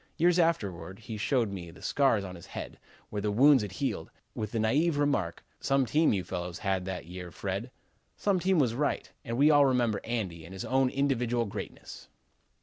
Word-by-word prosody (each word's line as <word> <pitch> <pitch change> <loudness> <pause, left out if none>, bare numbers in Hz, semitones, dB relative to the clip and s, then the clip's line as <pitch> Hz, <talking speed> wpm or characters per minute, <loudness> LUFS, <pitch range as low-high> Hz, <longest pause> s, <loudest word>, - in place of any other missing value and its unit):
Years 175 +2 +4
afterward 95 - 0
he 110 +1 -7
showed 115 0 +1
me 90 -3 -6
the 85 - -14
scars 135 -8 +2
on 90 -2 -6
his 85 -2 -11
head, - - -7 0.3
where 105 - -2
the 105 - 0
wounds 130 +5 +6
had 100 -3 -5
healed, 110 - -2 0.2
with 105 -1 -4
the 115 - -2
naïve 145 +9 +2
remark: 140 -13 0
'Some 135 -1 +2
team 155 +6 +3
you 95 -3 0
fellows 90 -2 -4
had 95 -3 -1
that 95 -3 -4
year, 90 +1 -7
Fred.' 100 +7 -4 0.5
Some 200 -3 +1
team 185 +1 +2
was 130 -7 +3
right. 145 +4 -1
And 115 -3 -3
we 145 +3 +6
all 145 -2 +6
remember 120 -5 +1
Andy 100 -9 -3
and 85 +4 -10
his 95 - -5
own 130 0 +2
individual 125 -4 +1
greatness." 100 0 -8
115 Hz, 195 wpm, -29 LUFS, 95-140 Hz, 0.5 s, wounds